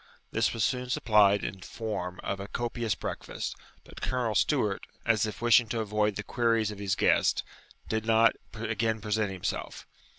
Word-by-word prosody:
This - - +2
was 115 - -1
soon 125 0 0
supplied 105 -4 +4
in 95 0 -4
form 90 -5 -4
of 100 - -2
a 100 - -6
copious 120 0 -2
breakfast, - - -5 0.3
but - - -13
Colonel 125 -4 0
Stewart, 105 -3 +1 0.2
as 110 -2 +3
if 110 +2 -7
wishing 120 0 +6
to 115 - -1
avoid 105 -1 0
the 105 - -4
queries 115 -2 +1
of 105 - -9
his 100 -2 0
guest, - - +3 0.4
did 110 0 -1
not 115 0 +5 0.2
again 110 0 -1
present 105 -1 0
himself. 95 -2 -4
110 Hz, 165 wpm, -29 LUFS, 105-115 Hz, 0.4 s, wishing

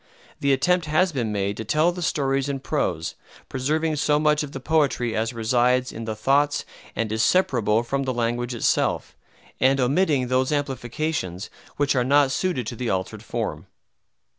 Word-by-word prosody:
The 140 - +2
attempt 160 +5 +2
has 175 +5 +2
been 120 -7 -2
made 100 0 -1
to 110 - -4
tell 155 +10 +2
the 180 0 -7
stories 135 -3 0
in 135 -1 -3
prose, 90 - -1 0.4
preserving 155 +4 0
so 150 0 +2
much 150 0 +3
of 150 -2 -5
the 135 - -6
poetry 135 -5 +1
as 110 +1 0
resides 125 +2 +1
in 115 0 -7
the 110 -1 -3
thoughts 140 +6 +1 0.3
and 110 0 -2
is 110 0 0
separable 115 - +2
from 135 +3 -2
the 130 - -1
language 120 +1 -1
itself, 115 - 0 0.4
and 135 +1 +3
omitting 140 0 +2
those 130 +2 +1
amplifications 135 - -3 0.3
which 145 -1 +1
are 125 - +3
not 140 +1 +4
suited 140 -5 -1
to 120 - -5
the 120 0 -3
altered 95 -1 -2
form. - - -4
130 Hz, 170 wpm, -24 LUFS, 115-150 Hz, 0.4 s, not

